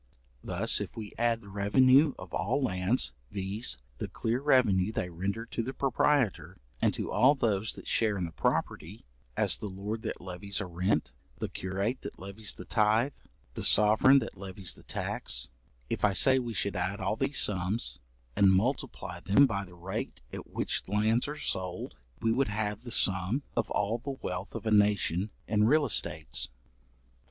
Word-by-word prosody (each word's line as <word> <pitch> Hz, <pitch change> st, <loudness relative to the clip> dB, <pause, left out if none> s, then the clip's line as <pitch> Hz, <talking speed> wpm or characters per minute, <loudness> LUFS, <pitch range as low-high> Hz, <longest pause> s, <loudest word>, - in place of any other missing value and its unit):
Thus -, -, +1 dB
if -, -, -6 dB
we 110 Hz, -2 st, -7 dB
add 115 Hz, -1 st, +1 dB
the 100 Hz, -, -13 dB
revenue 130 Hz, +9 st, +4 dB
of 90 Hz, -2 st, -11 dB
all 115 Hz, -, 0 dB
lands, 90 Hz, -, 0 dB, 0.2 s
viz. 100 Hz, +4 st, -2 dB, 0.2 s
the -, -, -3 dB
clear 115 Hz, +2 st, -2 dB
revenue 110 Hz, -9 st, +3 dB
they 90 Hz, -4 st, -3 dB
render 100 Hz, +7 st, -3 dB
to 115 Hz, -, -3 dB
the 130 Hz, +4 st, -5 dB
proprietor, 135 Hz, -3 st, +1 dB, 0.2 s
and -, -, +4 dB
to -, -, -4 dB
all 130 Hz, +7 st, +5 dB
those 110 Hz, -5 st, 0 dB
that -, -, -10 dB
share 110 Hz, -3 st, +2 dB
in 90 Hz, -, -1 dB
the 85 Hz, -, -7 dB
property, 85 Hz, +5 st, -2 dB, 0.3 s
as -, -, +3 dB
the 105 Hz, -, -4 dB
lord 100 Hz, +4 st, -5 dB
that -, -, -4 dB
levies 95 Hz, +2 st, -4 dB
a 100 Hz, -, -2 dB
rent, 90 Hz, -, -1 dB, 0.2 s
the -, -, -3 dB
curate 100 Hz, +7 st, -3 dB
that -, -, -7 dB
levies 100 Hz, +2 st, -3 dB
the 90 Hz, -, -8 dB
tythe, 110 Hz, +5 st, +2 dB, 0.4 s
the -, -, -5 dB
sovereign 110 Hz, +6 st, +6 dB
that 125 Hz, -, -2 dB
levies 95 Hz, -1 st, -3 dB
the -, -, -13 dB
tax; -, -, -3 dB, 0.4 s
if -, -, -2 dB, 0.2 s
say 130 Hz, -1 st, +5 dB
I, -, -, +3 dB
we 120 Hz, -3 st, -4 dB
should 100 Hz, +1 st, -1 dB
add 90 Hz, +3 st, -2 dB
all 105 Hz, -, 0 dB
these 135 Hz, +3 st, 0 dB
sums, 90 Hz, -, +1 dB, 0.4 s
and 100 Hz, -1 st, +5 dB
multiply 95 Hz, -4 st, -1 dB
them 100 Hz, +10 st, +5 dB
by 100 Hz, -6 st, -2 dB
the 90 Hz, -1 st, -15 dB
rate 85 Hz, -7 st, -5 dB
at -, -, -7 dB
which -, -, -1 dB
lands 110 Hz, +5 st, +2 dB
are 150 Hz, +1 st, -5 dB
sold, 90 Hz, -10 st, -3 dB, 0.3 s
we 115 Hz, -, +3 dB
would 130 Hz, +4 st, +2 dB
have 105 Hz, 0 st, -2 dB
the 120 Hz, -1 st, -8 dB
sum 95 Hz, +7 st, +1 dB
of -, -, 0 dB
all 105 Hz, +4 st, 0 dB
the 135 Hz, +2 st, -5 dB
wealth 90 Hz, +4 st, -4 dB
of 115 Hz, -1 st, -5 dB
a 110 Hz, -, 0 dB
nation 105 Hz, -2 st, +3 dB, 0.2 s
in 105 Hz, 0 st, +3 dB
real 150 Hz, +5 st, +4 dB
estates. 85 Hz, -, -1 dB
105 Hz, 180 wpm, -30 LUFS, 95-120 Hz, 0.4 s, sovereign